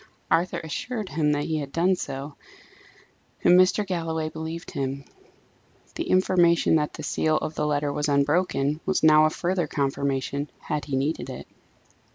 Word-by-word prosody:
Arthur 175 +2 +2
assured 215 +6 -4
him 150 -1 +1
that 145 0 -1
he 160 0 -1
had 140 -2 -6
done 180 +4 +2
so, 140 -2 -6 1.1
and - - +6
Mr. 185 +3 +3
Galloway 165 -4 -2
believed 160 +1 -6
him; 135 0 -3 0.9
the 335 - -4
information 175 -3 +3
that 150 -1 -1
the 155 - -8
seal 155 +1 +1
of 155 - -3
the 150 -1 -1
letter 145 -1 0
was 150 +1 -1
unbroken 145 +1 +1
was 190 -3 0
now 155 0 +7
a - - +4
further 175 0 -1
confirmation, 140 0 -2
had 150 -1 -4
he 140 - -3
needed 140 +4 -1
it. - - -7
155 Hz, 160 wpm, -25 LUFS, 145-170 Hz, 1.1 s, now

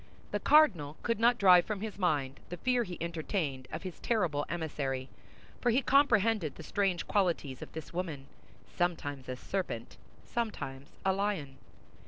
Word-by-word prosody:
The - - 0
cardinal 170 - +4
could 230 -2 0
not 240 +1 +5
drive 180 -4 +7
from 210 -2 -3
his 210 -2 -5
mind 145 -7 0
the 175 - -5
fear 250 +4 +2
he 180 -5 -7
entertained 160 -5 -2
of 160 - -5
his 185 -3 -7
terrible 170 -11 0
emissary—for 150 - -4
he 245 +4 +3
comprehended 225 - +3
the - - -9
strange 185 -1 0
qualities 170 -9 0
of - - -8
this 160 0 -7
woman, 165 -6 -3 0.4
sometimes 145 -7 -2
a 130 - -2
serpent, 150 -5 -4 0.3
sometimes 145 - -4 0.2
a 190 - +4
lion. 190 -10 -2
175 Hz, 150 wpm, -31 LUFS, 145-210 Hz, 0.4 s, drive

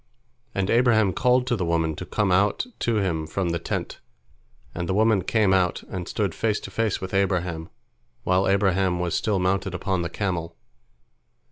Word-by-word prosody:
And 95 0 0
Abraham 115 -5 +4
called 125 +2 +2
to 125 - 0
the 95 - -2
woman 80 -2 0
to 90 - -6
come 100 0 0
out 100 - +2
to 115 - 0
him 85 -7 -1
from 90 +2 -2
the 85 0 -1
tent, - - -4 0.7
and 85 0 -4
the 95 - +1
woman 110 -3 +3
came 105 -1 +2
out, 90 -2 +1
and 90 -2 -5
stood 100 -5 -1
face 110 -2 0
to - - -8
face 115 -3 0
with 95 0 -6
Abraham, 90 -4 0 0.5
while 95 +1 +2
Abraham 95 -2 +2
was 90 -1 -1
still 105 -3 +1
mounted 95 0 0
upon 95 0 -1
the 85 - -2
camel. 85 -4 -3
95 Hz, 175 wpm, -24 LUFS, 90-105 Hz, 0.7 s, Abraham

